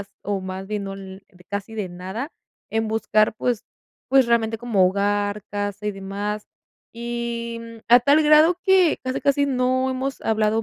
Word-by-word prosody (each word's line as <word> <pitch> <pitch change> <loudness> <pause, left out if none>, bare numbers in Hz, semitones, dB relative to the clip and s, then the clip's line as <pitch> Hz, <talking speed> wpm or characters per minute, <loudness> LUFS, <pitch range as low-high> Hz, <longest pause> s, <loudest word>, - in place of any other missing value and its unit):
vas 200 - -9
o 200 -1 -2
más 190 +1 -6
bien, 210 0 -3
no 195 - -5
l 190 0 -10
de 180 -3 -20
casi 205 +3 -5
de 205 -4 -3
nada, 190 - -6 0.4
en 225 0 0
buscar, 215 -1 +2
pues 240 -2 -1 0.5
pues, 265 -2 +5
realmente, 225 -1 +2
como 220 -6 +3
hogar, 205 +1 0
casa, 205 0 -3
y 210 - +1
demás. 200 +2 -4 0.5
Y, 235 0 -4
mm, 230 0 -10
a 240 +1 +9
tal 285 +5 +4
grado 305 +3 +6
que, 375 -4 +4
casi, 255 0 -2
casi, 280 +1 +2
no 260 0 +1
hemos 265 +1 -3
hablado 220 0 +1
220 Hz, 175 wpm, -23 LUFS, 200-250 Hz, 0.5 s, a